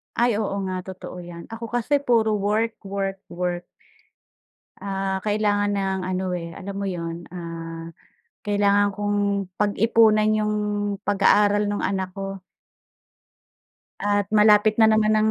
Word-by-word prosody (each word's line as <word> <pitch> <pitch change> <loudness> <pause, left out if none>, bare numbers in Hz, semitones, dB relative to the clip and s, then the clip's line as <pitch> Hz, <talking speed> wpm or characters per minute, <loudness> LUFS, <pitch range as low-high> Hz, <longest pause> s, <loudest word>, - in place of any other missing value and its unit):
Ay 235 -2 +2
oo 205 -2 -2
nga 185 0 -3
totoo 185 -1 -8
'yan, 175 +1 -10
ako 230 +1 -6
kasi 245 +4 +2
puro 225 -6 +2
work, 215 +3 0
work, 195 0 -3
work. 175 0 -3 1.2
Ah, 195 -1 -2
kailangan 205 -1 +1
ng 190 -1 -1
ano, 185 +1 -2
eh, 170 -1 -5
alam 195 +4 -7
mo 200 - -4
yun, 170 -2 -4
ah, 165 -2 -7 0.6
kailangan 205 0 +3
kong 205 0 -1 0.4
pag-ipunan 215 +1 +4
yung 215 0 +1 0.5
pag-aaral 205 +1 +3
nung 205 0 -2
anak 190 -1 -2
ko. 195 0 -5 1.6
At 205 -1 +1
malapit 210 0 +5
na 220 -1 +6
naman 215 0 +3
ang 215 0 +3
205 Hz, 130 wpm, -23 LUFS, 190-215 Hz, 1.6 s, na